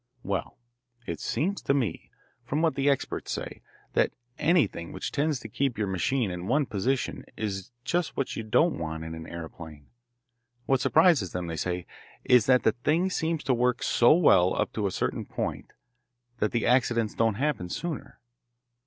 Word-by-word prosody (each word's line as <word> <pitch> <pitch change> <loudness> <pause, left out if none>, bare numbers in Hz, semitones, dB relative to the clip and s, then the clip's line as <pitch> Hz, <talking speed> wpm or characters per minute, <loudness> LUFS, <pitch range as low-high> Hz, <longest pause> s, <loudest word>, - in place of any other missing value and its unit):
"Well, 100 -1 -3 0.5
it - - -4
seems 195 +6 -1
to 140 - +1
me, 115 - -2 0.3
from 145 +6 -1
what 165 - +3
the 140 +1 +1
experts 140 - -1
say, - - -5 0.3
that - - +3 0.3
anything 145 - +2
which - - -4
tends 145 -1 0
to - - -7
keep 130 +2 -1
your 105 - 0
machine 100 +4 0
in 90 +1 -5
one 140 +5 +2
position 125 +5 -1
is 95 -3 -3
just 175 +5 -1
what 135 - -1
you - - -3
don't 135 +10 +2
want 80 -1 -4
in 80 0 -6
an 80 0 -8
aeroplane. 80 -3 -9 0.7
What 135 -1 +2
surprises 155 - +4
them, 90 -1 -3
they 85 -1 -4
say, 90 +2 -2 0.4
is 125 -4 +5
that 125 -1 +5
the 110 - +4
thing 160 - 0
seems 160 -3 -1
to 130 - +2
work 125 0 +1
so 120 - +4
well 95 - +5
up - - 0
to 105 -2 0
a - - -3
certain - - -2
point - - -4 0.7
that 105 - +2
the 115 - 0
accidents 120 -3 +2
don't 115 -2 +1
happen 135 -8 -1
sooner. 165 - -5
120 Hz, 175 wpm, -27 LUFS, 95-145 Hz, 0.7 s, is